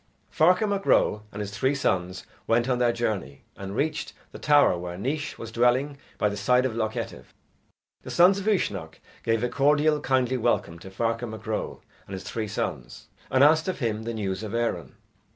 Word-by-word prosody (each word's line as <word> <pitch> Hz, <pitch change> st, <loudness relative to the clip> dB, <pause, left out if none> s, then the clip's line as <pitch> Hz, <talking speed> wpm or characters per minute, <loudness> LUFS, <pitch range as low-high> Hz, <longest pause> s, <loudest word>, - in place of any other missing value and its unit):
Ferchar 180 Hz, +6 st, +4 dB
Mac 200 Hz, -1 st, -2 dB
Ro 105 Hz, -, +3 dB
and 105 Hz, -, -6 dB
his 100 Hz, -1 st, -5 dB
three 135 Hz, +6 st, +1 dB
sons 90 Hz, -9 st, -1 dB, 0.2 s
went 115 Hz, +2 st, +2 dB
on 125 Hz, -2 st, +1 dB
their 120 Hz, -1 st, +3 dB
journey, 100 Hz, -, -3 dB
and 100 Hz, 0 st, -7 dB
reached 155 Hz, +5 st, -2 dB, 0.2 s
the -, -, -10 dB
tower 145 Hz, -9 st, +4 dB
where 90 Hz, 0 st, -6 dB
Naois 145 Hz, +9 st, -3 dB
was 115 Hz, -, -8 dB
dwelling 125 Hz, +5 st, +2 dB, 0.2 s
by -, -, +2 dB
the 100 Hz, -, -2 dB
side 125 Hz, +6 st, +2 dB
of 125 Hz, -4 st, -2 dB
Loch 110 Hz, -1 st, -1 dB
Etive. 65 Hz, -, -7 dB, 0.7 s
The -, -, -10 dB
sons 185 Hz, +3 st, +5 dB
of 200 Hz, -, -6 dB
Uisnech 95 Hz, -, -1 dB, 0.2 s
gave 115 Hz, 0 st, 0 dB
a -, -, +2 dB
cordial 150 Hz, +3 st, +2 dB
kindly 130 Hz, -2 st, +1 dB
welcome 110 Hz, -8 st, 0 dB
to 95 Hz, -, -10 dB
Ferchar 115 Hz, +4 st, -2 dB
Mac 110 Hz, 0 st, -9 dB
Ro 110 Hz, -1 st, -4 dB, 0.2 s
and 95 Hz, -, -9 dB
his 95 Hz, 0 st, -6 dB
three 110 Hz, +3 st, -4 dB
sons, 100 Hz, -, -5 dB, 0.2 s
and 130 Hz, +1 st, +4 dB
asked 155 Hz, +3 st, +5 dB
of 185 Hz, -, -2 dB
him 110 Hz, -4 st, -2 dB
the 115 Hz, +1 st, -4 dB
news 95 Hz, -3 st, -3 dB
of 110 Hz, 0 st, -5 dB
Erin. 120 Hz, 0 st, -2 dB
115 Hz, 195 wpm, -26 LUFS, 100-140 Hz, 0.7 s, sons